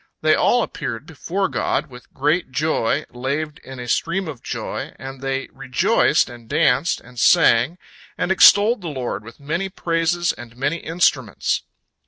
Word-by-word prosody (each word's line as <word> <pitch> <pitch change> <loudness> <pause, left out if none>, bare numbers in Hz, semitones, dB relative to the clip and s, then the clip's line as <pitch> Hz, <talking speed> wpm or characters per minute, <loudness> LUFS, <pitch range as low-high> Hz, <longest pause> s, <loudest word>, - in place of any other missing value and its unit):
They 155 0 +4
all 245 +7 +3
appeared 135 -5 -5
before 180 +5 -2
God - - -1
with 125 0 -13
great 150 +5 0
joy, 145 0 0
laved 145 +5 -3
in 130 -1 -10
a 120 - -6
stream 170 +8 0
of 140 -6 -7
joy, - - -5
and 135 0 -9
they 135 0 -2
rejoiced 130 -3 +2
and 120 -2 -12
danced 150 0 +2
and 125 0 -12
sang, 120 +11 +4 0.4
and 185 - -1
extolled 205 +4 +6
the 175 - -6
Lord 125 -8 -4
with 115 +5 -13
many 170 +7 -2
praises 170 -1 0
and 120 0 -12
many 145 +6 0
instruments. 150 - 0
145 Hz, 155 wpm, -21 LUFS, 125-170 Hz, 0.4 s, extolled